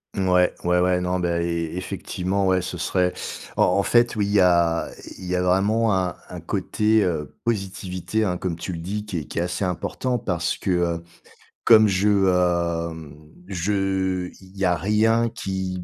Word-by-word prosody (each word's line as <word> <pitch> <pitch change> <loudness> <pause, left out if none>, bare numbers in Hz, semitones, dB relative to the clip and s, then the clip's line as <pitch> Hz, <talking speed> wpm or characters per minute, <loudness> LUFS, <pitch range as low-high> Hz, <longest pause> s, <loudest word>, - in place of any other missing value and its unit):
Ouais, 90 -2 +2
ouais, 90 0 +2
ouais. 90 0 +2
Non, 90 +1 -1
beh, 90 - 0 0.2
é 85 -1 -2
effectivement, 95 +1 -2
ouais, 95 -1 +3
ce 90 0 -5
serait 90 +1 0 0.4
en - - +4
en 100 - +2
fait, 120 +2 +3
oui, 105 -2 +1
il 100 - -2
y 105 - +4
a 85 -2 +3 0.3
il 95 - -9
y 90 0 -1
a 90 - +1
vraiment 105 +4 +2
un 90 -2 -1
un - - -7
côté, 110 0 +1
heu, 75 -5 -2
positivité, 100 -1 -2
hein, 90 -3 0
comme 90 -3 -3
tu 85 - -6
le 85 - -5
dis, 105 +5 -4
qui 90 -5 -4
est 75 - -7
qui - - -9
est - - +2
assez 90 +2 -2
important 120 +7 -2
parce 90 -5 -2
que, 95 - -2
heu, 85 -1 0 0.6
comme 110 -2 +7
je, 95 +2 +1 0.2
hem 85 -4 -1 0.3
je 95 -1 -1
il 95 +1 -17
y 100 - -2
a 90 -1 +3
rien 110 +4 +2
qui 95 -4 -4
90 Hz, 185 wpm, -23 LUFS, 90-100 Hz, 0.6 s, comme